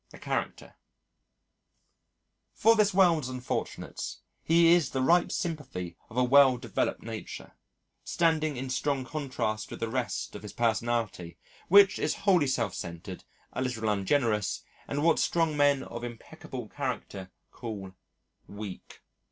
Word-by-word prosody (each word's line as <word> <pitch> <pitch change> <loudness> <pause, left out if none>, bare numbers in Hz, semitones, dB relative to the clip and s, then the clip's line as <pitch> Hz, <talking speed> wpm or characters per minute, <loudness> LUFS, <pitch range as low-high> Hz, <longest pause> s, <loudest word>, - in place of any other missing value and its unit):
A - - -12
Character - - -4 1.8
For 225 0 +5
this 210 -2 +3
world's 170 -8 +3
unfortunates, 125 -1 -4 0.2
his 170 +1 +4 0.2
is - - -5
the 130 - -2
ripe 175 +5 +4
sympathy 130 - -4
of 120 - -10
a 125 - +4
well 130 0 +6
developed 120 -4 -2
nature, - - -7 0.5
standing 155 -4 +1
in 130 +1 -4
strong 135 0 -1
contrast 130 -8 -3
with - - -8
the 115 - -1
rest 125 +1 -3
of - - -7
his 105 - -9
personality, 115 -6 -1 0.3
which 200 +1 +7
is - - 0
wholly 180 -8 +4
self 115 -7 0
centred, 85 +1 -7 0.3
a - - -3
little 125 -4 -2
ungenerous, 105 0 +1 0.2
and 145 +1 -2
what 165 0 +4
strong 165 -3 +1
men 145 -2 +3
of 120 0 -7
impeccable 120 0 -8
character 115 -8 -5 0.2
call 105 -5 -7 0.6
"weak." 100 -2 -9
130 Hz, 135 wpm, -29 LUFS, 110-155 Hz, 1.8 s, which